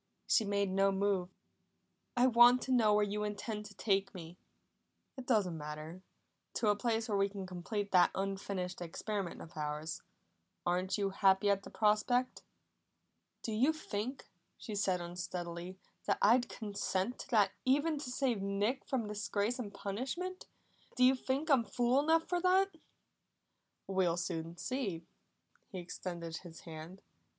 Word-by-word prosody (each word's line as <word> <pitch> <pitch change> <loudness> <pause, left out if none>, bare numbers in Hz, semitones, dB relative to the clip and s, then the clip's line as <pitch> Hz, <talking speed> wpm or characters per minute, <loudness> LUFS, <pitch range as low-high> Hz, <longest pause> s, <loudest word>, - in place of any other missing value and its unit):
She 220 - +3
made 200 -1 0
no 195 +1 +3
move. 195 -2 +1 0.9
"I 245 - +5
want 245 0 +7
to 260 - -3
know 220 -4 +5
where 210 0 +4
you 210 +1 -2
intend 210 +1 -4
to 205 - -14
take 195 -2 0
me." 170 -1 -8 0.8
"It 260 -3 -8
doesn't 195 -9 +2
matter. 155 +4 -7 0.5
To 215 - +2
a 205 - +4
place 225 +1 0
where 205 -3 +1
we 195 0 +3
can 195 -1 -6
complete 200 +3 -4
that 180 -2 +6
unfinished 195 -2 -3
experiment 190 +2 -4
of 165 - -13
ours. 150 +1 -3 0.6
Aren't 180 +2 +1
you 200 -1 0
happy 195 +1 +4
at 200 -1 +1
the - - -10
prospect?" 225 +4 +2 1.0
"Do 225 - -3
you 245 +8 +3
think," 260 -4 -4 0.3
she 220 - -7
said 190 -3 +1
unsteadily, 175 +1 -5 0.3
"that - - +2
I'd 240 +4 +4
consent 200 +1 -2
to - - -8
that 215 -5 +4
even 290 +4 +2
to 270 - -5
save 250 -4 0
Nick 200 +6 0
from 245 -5 -1
disgrace 210 +3 -1
and 210 -5 -4
punishment? 270 - -4 0.5
Do 255 - +3
you 255 +1 +7
think 270 +3 -2
I'm 260 -4 +5
fool 245 +3 +2
enough 320 +2 +3
for 355 -1 0
that?" 375 +1 +3 1.1
"We'll 185 -3 +1
soon 170 -1 -3
see." 200 -6 -3 0.7
He 190 - -6
extended 170 -2 -5
his 170 -3 -11
hand. 165 +3 -9
205 Hz, 150 wpm, -34 LUFS, 185-245 Hz, 1.1 s, want